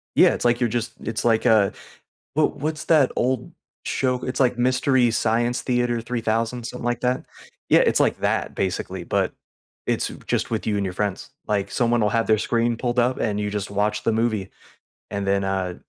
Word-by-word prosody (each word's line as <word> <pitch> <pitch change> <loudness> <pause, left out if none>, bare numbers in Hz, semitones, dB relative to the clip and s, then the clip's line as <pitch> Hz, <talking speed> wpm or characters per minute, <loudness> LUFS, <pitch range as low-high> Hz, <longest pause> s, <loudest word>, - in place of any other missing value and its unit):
Yeah, - - +6
it's - - -4
like 120 0 +3
you're 120 -2 +1
just 115 0 -2
it's 110 0 -3
like 115 -1 +2
a 110 -4 +4 0.6
what 155 0 +2
what's 155 +2 -3
that 150 -5 +4
old 130 0 -1 0.3
show? 130 -1 0
It's 130 - -3
like 125 -2 +3
Mystery 130 0 +3
Science 115 +2 +1
Theater 120 -2 0
3000, 115 0 -2
something 125 +1 -6
like 120 0 -1
that. 125 +1 0 0.4
Yeah, - - +6
it's - - +3
like - - +2
that, - - 0
basically, 95 -1 -3
but - - 0 0.5
it's - - 0 0.2
just - - -1
with - - -2
you 105 - +1
and 100 - 0
your 90 - -3
friends, 100 +4 -3 0.2
like, 100 -2 0
someone 120 -2 +1
will 105 - +3
have 115 +1 +1
their 110 -1 +4
screen 115 +2 +1
pulled 120 +1 -2
up, 125 +2 +1
and 105 -2 -1
you 105 0 -2
just 105 0 -3
watch 105 +1 -1
the - - +2
movie, 110 -3 0 0.6
and 100 -1 -3
then, 100 0 +1
uh, 95 -2 -1
115 Hz, 195 wpm, -23 LUFS, 105-125 Hz, 0.6 s, Yeah